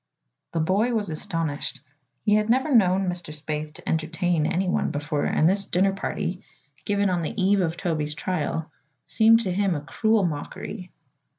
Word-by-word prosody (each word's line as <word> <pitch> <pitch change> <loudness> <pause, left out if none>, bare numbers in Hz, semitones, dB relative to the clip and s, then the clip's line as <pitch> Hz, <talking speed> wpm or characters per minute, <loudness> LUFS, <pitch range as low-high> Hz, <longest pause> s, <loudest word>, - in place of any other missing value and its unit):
The 165 - 0
boy 205 +9 +2
was 205 -5 -1
astonished. 155 -5 -2 0.4
He 210 - +4
had 215 +1 +2
never 265 +5 +2
known 190 -4 +4
Mr. 175 -3 -4
Spaythe 150 0 -5
to - - -13
entertain 165 0 0
anyone 180 +1 0
before 150 0 -2
and 155 - +3
this 195 +2 +2
dinner 195 +2 +2
party, 185 -1 -3 0.4
given 205 0 +1
on 175 -1 0
the 185 +7 -4
eve 195 +1 +3
of 165 -1 -1
Toby's 155 -4 -2
trial, 160 -1 -2 0.3
seemed 225 +1 +5
to 195 -5 -2
him 195 -2 +1
a 145 - -3
cruel 220 +6 +1
mockery. 175 +4 -5
180 Hz, 165 wpm, -25 LUFS, 155-205 Hz, 0.4 s, seemed